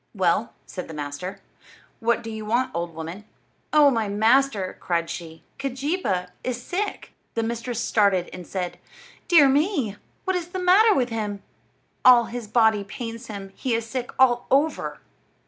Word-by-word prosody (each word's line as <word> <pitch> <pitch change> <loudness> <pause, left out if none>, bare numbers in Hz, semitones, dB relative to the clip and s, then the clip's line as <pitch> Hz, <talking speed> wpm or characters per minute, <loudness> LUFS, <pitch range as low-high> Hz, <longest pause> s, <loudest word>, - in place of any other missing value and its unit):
"Well," 190 +4 +1
said 180 - -7
the 160 - -8
master, 145 +6 -5 0.6
"what 235 +1 +1
do 225 - -6
you 220 0 -6
want, 240 +4 0
old 170 -1 -3
woman?" 165 +5 -6 0.5
"Oh, 295 -2 +6
my 225 -4 0
master," 220 -1 +2
cried 170 -1 -1
she, 165 -2 -8 0.2
"Keejeepaa 265 - -2
is 250 -1 -2
sick!" 385 +11 -4 0.2
The 230 - 0
mistress 235 +1 -3
started 200 -6 +2
and 180 -2 -8
said: 180 -2 -4 0.5
"Dear 320 -5 +7
me! 275 - +1 0.3
What 375 -1 +1
is 350 -2 -2
the 365 +2 -6
matter 390 +4 +5
with 250 -2 +1
him?" 210 -3 -3 0.6
"All 245 -2 +8
his 235 -1 -6
body 220 -2 +3
pains 230 +3 -7
him. 200 -2 -7
He 250 -3 -1
is 230 0 -2
sick 250 +1 -4
all 245 -2 +4
over." 290 +4 +1
230 Hz, 160 wpm, -24 LUFS, 195-265 Hz, 0.6 s, All